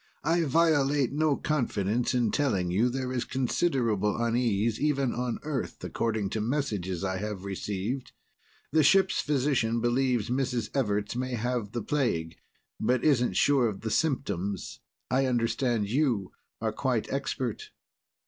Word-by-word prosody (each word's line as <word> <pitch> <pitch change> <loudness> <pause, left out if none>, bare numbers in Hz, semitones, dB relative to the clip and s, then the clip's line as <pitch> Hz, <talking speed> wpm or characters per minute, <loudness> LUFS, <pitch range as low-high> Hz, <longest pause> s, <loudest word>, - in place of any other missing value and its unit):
I 170 0 +2
violate 145 -3 +3
no 150 0 +2
confidence 120 -5 0
in 120 -3 +2
telling 100 -12 +1
you 110 +7 +3
there 130 0 -3
is 125 -1 0
considerable 120 - 0
unease, 115 -2 +1
even 140 -4 +1
on 125 0 -2
Earth, 150 -3 -4
according 110 -4 -1
to 110 - -1
messages 105 - -2
I 95 -1 -1
have 100 -1 -5
received. 100 +6 -3 0.6
The 160 +2 +4
ship 190 +6 +5
physician 130 -5 +1
believes 120 -1 +1
Mrs. 125 -2 -1
Everts 105 -5 0
may 130 0 -2
have 120 -2 -2
the 120 -3 -2
plague, 85 - -1 0.4
but 125 0 +1
isn't 130 -5 +3
sure 135 -4 +4
of 100 -3 -5
the 110 - -3
symptoms. 100 - -1 0.3
I 130 +1 +3
understand 115 -2 0
you 120 -5 0 0.3
are - - -1
quite - - -1
expert." - - -3
120 Hz, 140 wpm, -28 LUFS, 105-135 Hz, 0.6 s, ship